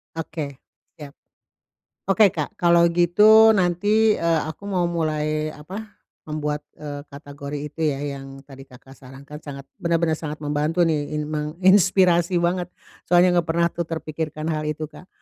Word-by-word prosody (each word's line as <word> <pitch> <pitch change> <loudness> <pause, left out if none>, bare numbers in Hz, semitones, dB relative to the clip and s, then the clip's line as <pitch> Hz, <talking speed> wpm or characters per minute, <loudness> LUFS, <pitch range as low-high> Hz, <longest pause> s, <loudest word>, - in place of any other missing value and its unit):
Oke, 155 -3 -5 0.4
siap. 145 -2 -10 1.0
Oke, 205 +2 +6
Kak. 150 -3 -3
Kalau 170 -1 +5
gitu 210 +6 +6
nanti, 205 +5 +2
eee, 165 -1 +1
aku 160 +6 -8
mau 180 -3 0
mulai, 155 -2 -1
apa, 195 +8 -9 0.3
membuat, 150 -1 -3 0.2
eee, 145 -1 -7
kategori 145 0 -8
itu 165 - -12
ya 135 - -4 0.2
yang 135 0 -11
tadi 135 -1 -13
Kakak 130 +1 -16
sarankan. 135 +3 -12
Sangat 140 -3 -9 0.2
bener-bener 170 -1 +1
sangat 150 -1 -6
membantu 150 +4 0
nih, 150 -2 -1
in 150 - -2
menginspirasi 180 +2 +3
banget. 175 +1 0 0.4
Soalnya 180 0 +5
enggak 170 - 0
tuh - - 0
pernah 170 +1 +2 0.3
terpikirkan 155 0 -5
hal 155 -1 -2
itu, 155 +1 -3
Kak. 180 - -14
160 Hz, 145 wpm, -22 LUFS, 150-175 Hz, 1.0 s, Oke